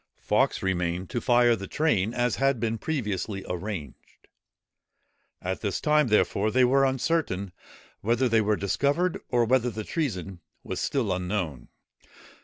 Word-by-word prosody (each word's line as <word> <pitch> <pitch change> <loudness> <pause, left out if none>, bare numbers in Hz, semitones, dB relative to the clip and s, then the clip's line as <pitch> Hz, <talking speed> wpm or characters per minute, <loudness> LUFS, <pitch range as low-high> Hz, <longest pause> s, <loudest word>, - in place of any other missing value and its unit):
Fawkes - - +1
remained 90 -1 -1
to 120 - -2
fire 120 -1 +4
the 100 -2 -7
train, 115 -10 +1
as 120 0 0
had 135 -2 +2
been 115 0 -1
previously 105 - -3
arranged. 90 - -7 1.2
At 95 +1 -3
this 100 -3 -1
time, 150 -2 +3
therefore, 105 -1 +2
they 130 +3 +3
were 135 +2 +4
uncertain 130 - -1 0.5
whether 120 +4 +1
they 115 -2 +3
were 105 0 +2
discovered, 145 - 0
or 120 -2 +2
whether 125 +1 +2
the 110 -1 -5
treason 95 - -3 0.2
was - - -4
still 115 -9 0
unknown. 90 -8 -3
110 Hz, 140 wpm, -26 LUFS, 95-130 Hz, 1.2 s, fire